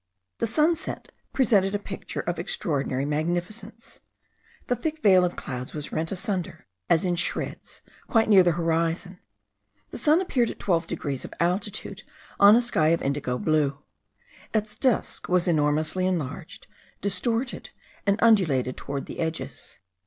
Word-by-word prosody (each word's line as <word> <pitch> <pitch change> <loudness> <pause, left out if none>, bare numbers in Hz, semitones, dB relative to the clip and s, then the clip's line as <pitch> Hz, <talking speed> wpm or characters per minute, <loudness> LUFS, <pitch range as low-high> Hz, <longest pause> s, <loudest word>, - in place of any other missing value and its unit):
The 230 - +1
sunset 320 - 0 0.2
presented 205 -6 +3
a - - +3
picture 200 -1 -6
of 175 0 -3
extraordinary 145 -8 -1
magnificence. 175 +9 -4 0.7
The 245 - 0
thick 310 +5 -4
veil 185 -3 +6
of 180 0 0
clouds 125 +1 -6
was 150 -1 -5
rent 160 +1 -2
asunder, 185 -4 -3 0.2
as 165 +2 +3
in 180 - +1
shreds, 170 - -3 0.3
quite 225 -1 +3
near 200 -3 +7
the 175 -2 +3
horizon; 170 +2 -1 0.7
the - - -6
sun 305 +6 +4
appeared 250 -11 +1
at - - -7
12 170 -3 0
degrees 140 -5 -3
of - - -9
altitude 185 +4 -1 0.4
on 205 +2 +9
a 240 - +5
sky 160 -10 +1
of 165 +1 +2
indigo 135 -2 -1
blue. 150 -1 +1 0.8
Its 210 0 0
disk 245 +1 0
was 180 0 +2
enormously 155 +3 +1
enlarged, 170 -8 -4 0.4
distorted, 235 +5 -1 0.4
and 200 0 +3
undulated 160 - +3
toward 140 -1 -5
the - - -8
edges. 160 0 -4
180 Hz, 145 wpm, -26 LUFS, 155-215 Hz, 0.8 s, on